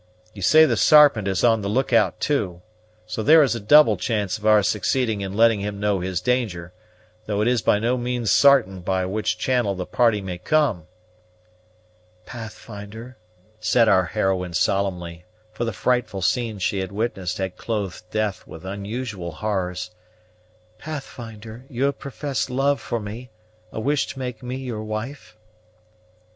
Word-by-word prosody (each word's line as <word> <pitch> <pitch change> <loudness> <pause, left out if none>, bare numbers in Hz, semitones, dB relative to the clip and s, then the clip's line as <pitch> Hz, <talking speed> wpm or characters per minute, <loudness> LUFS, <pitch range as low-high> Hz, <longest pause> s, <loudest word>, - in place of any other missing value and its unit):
You 100 - -10
say 155 +11 +6
the 125 -6 +1
Sarpent 145 -9 +6
is 95 -2 -1
on 115 -2 +4
the 100 - -3
look 125 +4 0
out 105 -6 +3
too; 95 -12 -1 0.4
so 110 +1 -4
there 155 +6 +7
is 130 - +1
a 115 - -3
double 150 +9 +6
chance 110 -3 -2
of 105 - -3
our 105 -1 +5
succeeding 110 +1 0
in 95 0 -5
letting 115 -2 +4
him 100 0 -4
know 105 -1 +1
his 90 0 -3
danger; 105 -9 -1 0.5
though 105 -1 -1
it 105 - +1
is 125 -2 +2
by 105 - +3
no 120 +4 0
means 120 -4 -1
sartain 125 -10 +4
by 95 +1 -1
which 105 +4 -2
channel 120 -6 0
the 90 -1 -4
party 115 -1 +2
may 90 -3 -6
come." 115 - +1 1.4
"Pathfinder," 110 0 -9 0.4
said 110 +2 +3
our 95 -3 +4
heroine 95 -3 -1
solemnly, 90 -3 -1 0.3
for 120 - -3
the 115 - -2
frightful 105 -3 -1
scenes 110 -1 -1
she 100 0 0
had 95 0 -4
witnessed 100 -4 -3
had 95 -1 -3
clothed 105 -5 -4
death 110 -2 -2
with 80 +3 -11
unusual 100 -1 -5
horrors, 90 -4 -3 0.9
"Pathfinder, 115 -6 -8
you 130 0 -3
have 140 0 0
professed 140 -1 -3
love 135 +2 +1
for 120 - -3
me, 110 +4 -8 0.4
a - - -5
wish 145 +5 0
to - - -8
make 125 -3 -5
me 125 0 -5
your 125 -5 -5
wife?" 110 +3 -6
110 Hz, 160 wpm, -23 LUFS, 95-125 Hz, 1.4 s, there